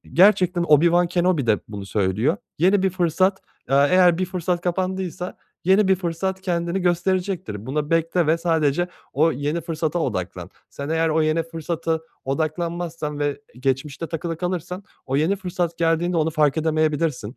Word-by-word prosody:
Gerçekten 180 0 +4
Obi-Wan 170 +3 +4
Kenobi 175 -7 +1
de 105 -2 +3
bunu 100 -2 -7
söylüyor. 105 - +1 0.2
Yeni 185 +4 +3
bir 190 - +2
fırsat, 185 +2 +1 0.3
eee, 135 - +4
eğer 180 -2 +5
bir 185 - +1
fırsat 180 -1 -2
kapandıysa 185 0 -3 0.3
yeni 190 +2 +4
bir 190 - +6
fırsat 185 +2 -3
kendini 175 0 -1
gösterecektir. 175 - -1
Buna 150 +3 -2
bekle 165 +1 +2
ve 160 +2 +3
sadece 165 0 +1 0.2
o 160 +4 +3
yeni 145 +5 -2
fırsata 165 0 -2
odaklan. 95 - -3 0.2
Sen 140 0 -6
eğer 165 +1 +1
o 160 0 +2
yeni 155 +1 +1
fırsata 165 0 -3 0.2
odaklanmazsan 160 +1 -3
ve 145 -1 -1 0.2
geçmişte 135 +4 -2
takılı 165 0 -3
kalırsan 180 +2 -4 0.2
o 135 +1 -1
yeni 165 +7 +2
fırsat 180 -3 -3
geldiğinde 170 +1 +1
onu 160 0 +2
fark 150 -2 +2
edemeyebilirsin. 155 -6 0
165 Hz, 150 wpm, -22 LUFS, 150-180 Hz, 0.3 s, bir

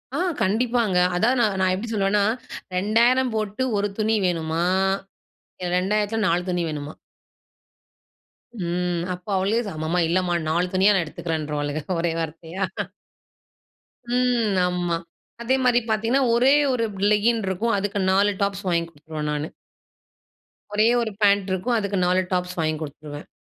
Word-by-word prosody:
ஆ, - - 0 0.2
கண்டிப்பாங்க. 225 0 +1 0.2
அதாவது 240 +7 +2
நான் 210 -4 +1
நான் 185 -1 +3
எப்டி 205 +5 -5
சொல்லுவேன்னா 200 0 +2 0.5
2000 235 +6 +3
போட்டு 215 +3 -2
ஒரு 205 0 +1
துணி 220 +1 +2
வேணுமா? 165 -2 0 1.0
2000 205 +4 0
4 175 0 +2
துணி 175 -1 0
வேணுமா? 150 0 -5 1.7
ம். 175 0 -1
அப்ப 180 +2 -11
அவளே 200 +5 +1 0.2
"அம்மா 155 +3 -1
இல்லைம்மா, 175 +1 +1
நாலு 175 +3 +1
துணியா 190 +2 +5
நான் 185 - +2
எடுத்துக்கிறேன்றுவாளுக" 150 -2 -3 0.2
ஒரே 170 0 0
வார்த்தையா. 165 +3 -4 1.5
ம். 245 -4 +2
ஆமா 175 -1 -1 0.5
அதே 245 +3 +2
மாரி 245 -1 +4
பார்த்திங்கன்னா, 225 +5 +2
ஒரே 250 +4 +5 0.2
1 240 -2 0 0.3
லெகின் 225 +2 +3
இருக்கும். 200 +5 0
அதுக்கு 200 +1 -2
4 200 +2 +3
டாப்ஸ் 200 0 -1
வாங்கி 170 -2 +1
குடுத்துருவேன் 150 -1 -6
நானு. 150 +1 -2 1.2
ஒரே 210 +2 +3
1 225 -2 -2
பேண்ட் 200 -1 +3
இருக்கும். 230 +6 0
அதுக்கு 200 -1 -2
4 180 +1 +3
டாப்ஸ் 180 0 -2
வாங்கி 155 -1 +1
குடுத்துருவேன். 145 0 -8
190 Hz, 130 wpm, -23 LUFS, 170-220 Hz, 1.7 s, துணியா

